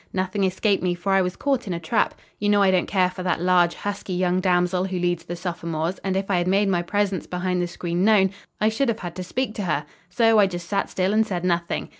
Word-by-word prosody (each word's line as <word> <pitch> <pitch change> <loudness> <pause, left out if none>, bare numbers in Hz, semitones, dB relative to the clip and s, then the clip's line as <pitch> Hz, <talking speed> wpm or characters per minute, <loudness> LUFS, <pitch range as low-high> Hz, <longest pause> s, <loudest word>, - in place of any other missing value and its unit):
"Nothing 190 +2 -1
escaped 195 +2 +1
me, 180 -1 0
for 185 +3 -3
I 195 0 +4
was 180 0 -2
caught 270 -5 -1
in 185 - -2
a - - -4
trap. 170 +8 0 0.2
You 205 - 0
know 205 -1 +4
I 190 - +4
don't 185 -1 +1
care 185 -2 +2
for 185 - -7
that 180 -2 0
large, 175 -1 +3
husky 200 -2 -4
young 180 0 +1
damsel 180 0 +1
who 190 -1 -3
leads 175 -1 -1
the 175 - -5
sophomores, 170 -1 -3
and 190 -1 -2
if 195 +1 -2
I 180 - +3
had 175 - -1
made 195 +2 +2
my 175 -2 +1
presence 195 0 -1
behind 180 0 -1
the 175 - -1
screen 175 0 -2
known, 200 -3 +4 0.3
I 215 - +3
should 235 +4 0
have 225 -1 -2
had 175 -2 -5
to 185 - -4
speak 245 +5 -2
to 205 - -2
her. 150 -4 -1 0.2
So 225 +3 +4
I 200 - +6
just 175 -2 -6
sat 200 - -1
still 190 +2 0
and 220 +1 +4
said 180 -5 -3
nothing. 170 -1 -1
185 Hz, 260 wpm, -23 LUFS, 175-200 Hz, 0.3 s, I